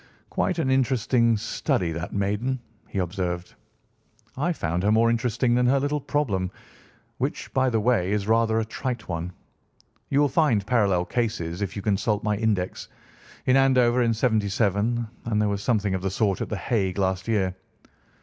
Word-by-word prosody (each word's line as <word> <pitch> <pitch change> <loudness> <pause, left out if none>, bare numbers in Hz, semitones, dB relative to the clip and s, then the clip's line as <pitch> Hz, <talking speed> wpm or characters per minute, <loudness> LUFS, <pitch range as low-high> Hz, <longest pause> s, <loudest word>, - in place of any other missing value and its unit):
"Quite 180 - 0
an 130 -5 +1
interesting 125 -3 +2
study, 90 -3 -1
that 85 +2 -5
maiden," 105 +6 -1 0.3
he - - -7
observed. 90 -1 -2 0.8
"I 160 +7 0
found 85 - -2
her 105 +2 +2
more 115 +1 +4
interesting 120 +1 +1
than 125 0 +3
her 135 +2 +4
little 145 +2 -1
problem, 105 -12 -1 0.7
which, - - -3
by 130 0 +3
the 115 -2 +1
way, 105 -5 +2
is 105 -1 0
rather 110 0 +3
a 110 - -1
trite 120 +1 -4
one. 85 0 -3 0.8
You 140 - +2
will 145 - +5
find 130 -9 +2
parallel 100 -7 +2
cases, 105 -7 -2
if 100 -1 -3
you 100 - -5
consult 105 +1 0
my 105 -1 +1
index, 100 -4 -1 0.6
in 130 - +4
Andover 125 -2 +4
in 115 -2 +2
'77, 110 0 +1 0.2
and 110 -2 0
there 105 -1 +2
was 100 -1 -2
something 105 -4 +1
of 95 - -1
the 95 - -1
sort 100 -1 0
at - - -3
The 105 - -2
Hague 95 -5 -1
last 95 -1 0
year. 95 -5 0
110 Hz, 170 wpm, -25 LUFS, 95-125 Hz, 0.8 s, will